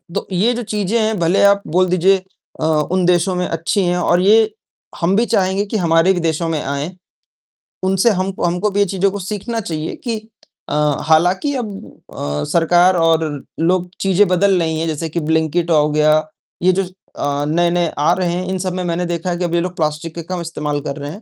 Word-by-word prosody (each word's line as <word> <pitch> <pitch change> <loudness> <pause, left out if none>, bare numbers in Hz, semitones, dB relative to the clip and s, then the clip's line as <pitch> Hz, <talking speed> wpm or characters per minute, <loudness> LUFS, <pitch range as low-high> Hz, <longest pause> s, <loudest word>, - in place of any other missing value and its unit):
तो, 200 - -2
ये 205 +7 +2
जो 245 0 -4
चीज़ें 210 +1 -1
हैं 220 0 0
भले 175 +4 +2
आप 200 0 +5
बोल 185 +4 +2
दीजिए 185 +2 +3 0.4
अ, - - 0
उन 160 +4 +1
देशों 180 +1 +2
में 180 0 -1
अच्छी 165 +4 -1
हैं 175 0 +1
और 175 0 +2
ये, 215 +2 +4 0.5
हम 175 +3 +2
भी 230 +3 +3
चाहेंगे 195 -1 +1
कि 215 +2 -2
हमारे 170 0 +3
भी 180 - -2
देशों 165 0 -1
में 155 -2 -1
आए। 140 +4 -3 0.9
उनसे 190 +4 +3
हमको 190 -2 -2
हमको 180 +4 0
भी 200 - -1
ये 200 - +4
चीज़ों 195 +1 0
को 205 - -5
सीखना 210 +4 -4
चाहिए 160 -6 -4
कि 235 -3 -2 0.5
अ, - - -3 0.3
हालाँकि 180 - +3
अब 220 -6 -4 0.4
अ, 75 +1 -3
सरकार 175 +2 +4
और 165 -1 +3 0.4
लोग 180 +2 +1
चीज़ें 195 +1 +3
बदल 190 +1 +3
रही 160 -2 -1
हैं 165 - -1
जैसे 160 +1 -3
कि 170 - -2
ब्लिंकेट 160 +2 0
औ 150 -2 +4
गया, 155 0 +3 0.5
ये 185 - +5
जो 195 +1 0
अ, 145 -6 -4
नए-नए 175 +2 +1
आ 150 +4 +3
रहे 175 -2 0
हैं, 180 +1 -2
इन 190 - -1
सब 185 -1 -2
में 185 0 -3
मैंने 175 0 -1
देखा 170 +1 -3
है 175 - -1
कि 180 - -3
अब 170 - -3
ये 170 - +2
लोग 180 0 -4
प्लास्टिक 155 0 -2
का 170 - -4
कम 175 - -4
इस्तेमाल 150 -3 -3
कर 140 - -3
रहे 145 +1 -6
हैं, 200 - -10
175 Hz, 215 wpm, -18 LUFS, 165-195 Hz, 0.9 s, आप